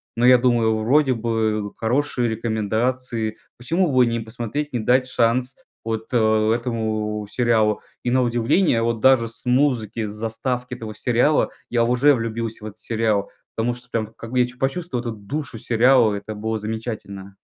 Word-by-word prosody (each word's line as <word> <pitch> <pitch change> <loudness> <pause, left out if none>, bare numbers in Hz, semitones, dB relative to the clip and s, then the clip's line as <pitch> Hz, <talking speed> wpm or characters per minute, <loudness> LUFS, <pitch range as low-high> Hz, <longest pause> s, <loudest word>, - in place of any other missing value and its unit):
Но 120 +1 +2
я 125 0 +8
думаю: 120 -3 +2
вроде 130 +5 +3
бы 110 -3 -1
хорошие 125 +1 0
рекомендации, 110 +1 -2 0.2
почему 165 +7 0
бы 130 -1 +5
не 115 0 -1
посмотреть, 120 +6 -4
не 120 - 0
дать 125 +4 +3
шанс 125 +1 +1 0.3
вот, 110 -1 -3
э, 110 -2 +3
этому 110 -3 -2
сериалу? 110 -2 +2 0.2
И, 125 - 0
на 130 +1 +3
удивление, 120 +4 +2
вот 115 0 0
даже 130 -1 +4
с 115 +2 -11
музыки, 125 -4 +1
с - - -4
заставки 115 +4 -3
этого 110 -3 -7
сериала, 125 +7 +2 0.2
я 120 -1 +2
уже 125 +5 +4
влюбился 115 -1 -4
в - - -5
этот 105 - -11
сериал, 110 -3 0 0.3
потому 120 +2 0
что 125 0 -15
прям, 110 -2 -1
как 115 - -9
бы, 125 - +1
я 125 - +4
чу 125 0 -13
почувствовал 135 0 -2
эту 120 - -3
душу 115 +4 -6
сериала, 115 -1 +4
это 100 +2 -6
было 110 +1 -3
замечательно. 105 -3 -6
115 Hz, 170 wpm, -22 LUFS, 110-125 Hz, 0.3 s, я